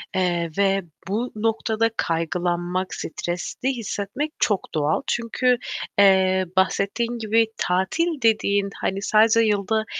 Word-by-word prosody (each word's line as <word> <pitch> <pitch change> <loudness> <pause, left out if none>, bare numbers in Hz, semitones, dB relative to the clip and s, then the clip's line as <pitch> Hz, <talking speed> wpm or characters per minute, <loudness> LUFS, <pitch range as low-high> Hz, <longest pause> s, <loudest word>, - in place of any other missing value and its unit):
eee, 175 -3 0
ve 195 -1 +2 0.2
bu 225 +6 -2
noktada 225 +1 0
kaygılanmak, 175 +2 -1
stresli 175 - -4
hissetmek 240 +3 -3
çok 205 -3 0
doğal. 155 -1 +1
Çünkü, 245 +2 +1 0.4
eee, 190 -1 +5
bahsettiğin 200 +5 +1
gibi, 225 +1 +2
tatil 270 - 0
dediğin 205 -3 +2
hani 195 +1 -1
sadece 220 +2 +4
yılda 215 0 +1
200 Hz, 110 wpm, -23 LUFS, 185-225 Hz, 0.4 s, eee